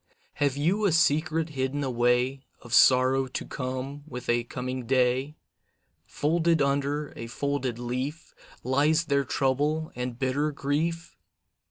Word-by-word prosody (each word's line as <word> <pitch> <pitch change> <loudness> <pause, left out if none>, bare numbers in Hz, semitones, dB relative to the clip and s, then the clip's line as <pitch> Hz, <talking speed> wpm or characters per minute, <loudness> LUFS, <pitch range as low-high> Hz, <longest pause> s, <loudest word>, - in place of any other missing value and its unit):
Have 140 -1 0
you 185 +9 +1
a 195 - +3
secret 160 0 +2
hidden 140 0 -2
away, 125 +1 +1 0.2
Of 120 -1 -8
sorrow 130 +1 +5
to 130 - -5
come 130 +2 -5
with 125 -5 -7
a 120 0 +2
coming 125 0 -5
day? 130 +3 +1 0.7
Folded 165 +2 +1
under 140 +1 0
a 115 - -6
folded 135 -1 -2
leaf, 130 +6 -4 0.3
Lies 150 +6 +2
there 140 -2 +1
trouble 145 +4 0
and 125 -1 -4
bitter 135 +4 0
grief? 160 +4 -2
140 Hz, 130 wpm, -27 LUFS, 130-150 Hz, 0.7 s, sorrow